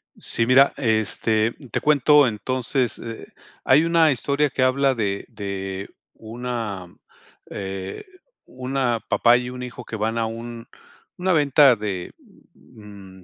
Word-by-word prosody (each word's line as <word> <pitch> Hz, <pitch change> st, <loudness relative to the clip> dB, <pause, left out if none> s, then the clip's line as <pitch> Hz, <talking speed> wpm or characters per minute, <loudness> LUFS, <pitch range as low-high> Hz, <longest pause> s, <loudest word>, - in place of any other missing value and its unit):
Sí, 115 Hz, 0 st, -2 dB
mira, 135 Hz, +2 st, +5 dB
este, 110 Hz, -2 st, +1 dB, 0.2 s
te -, -, 0 dB
cuento, 150 Hz, -1 st, +4 dB
entonces, 125 Hz, +2 st, -2 dB
eh, 115 Hz, -1 st, -8 dB, 0.4 s
hay 140 Hz, +4 st, +5 dB
una 165 Hz, -2 st, +4 dB
historia 140 Hz, +3 st, 0 dB
que 130 Hz, -, -1 dB
habla, 135 Hz, +1 st, +2 dB
de 100 Hz, -3 st, -2 dB
de 100 Hz, -2 st, -5 dB, 0.2 s
una, 115 Hz, -4 st, -5 dB, 0.6 s
eh, 95 Hz, -1 st, -6 dB, 0.4 s
una 130 Hz, -2 st, -2 dB
papá, 120 Hz, +1 st, +4 dB
y 125 Hz, 0 st, -4 dB
un 125 Hz, 0 st, -8 dB
hijo, 125 Hz, 0 st, -8 dB
que 110 Hz, -, -6 dB
van 110 Hz, +2 st, -2 dB
a 115 Hz, -, 0 dB
un 115 Hz, +1 st, -7 dB, 0.5 s
una 185 Hz, +1 st, +1 dB
venta 145 Hz, -3 st, +5 dB
de, 100 Hz, -4 st, -5 dB, 0.4 s
mm, 100 Hz, -3 st, -15 dB
120 Hz, 130 wpm, -22 LUFS, 105-130 Hz, 0.6 s, mira